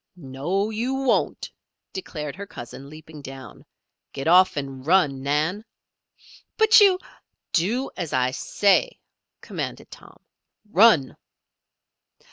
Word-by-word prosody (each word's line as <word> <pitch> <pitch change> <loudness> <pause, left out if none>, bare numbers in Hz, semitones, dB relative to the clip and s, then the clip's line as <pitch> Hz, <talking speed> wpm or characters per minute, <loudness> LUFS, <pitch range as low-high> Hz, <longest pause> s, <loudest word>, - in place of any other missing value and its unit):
"No 175 +8 -3
you 240 +5 -2
won't," 270 -1 0 0.4
declared 150 -6 -6
her 200 +2 -8
cousin, 135 - -10
leaping 155 0 -12
down. 135 -4 -11 0.5
"Get 135 +2 -5
off 180 0 +5
and 135 -2 -5
run, 150 -5 +2
Nan." 155 +9 -1 0.9
"But 440 0 +6
you 390 -3 +6 0.3
" - - -57
"Do 240 +9 -2
as 170 -5 -5
I 130 -2 +1
say!" 205 - +1 0.4
commanded - - -6
Tom. - - -14 0.5
"Run!" 185 - +4
165 Hz, 110 wpm, -23 LUFS, 140-210 Hz, 0.9 s, But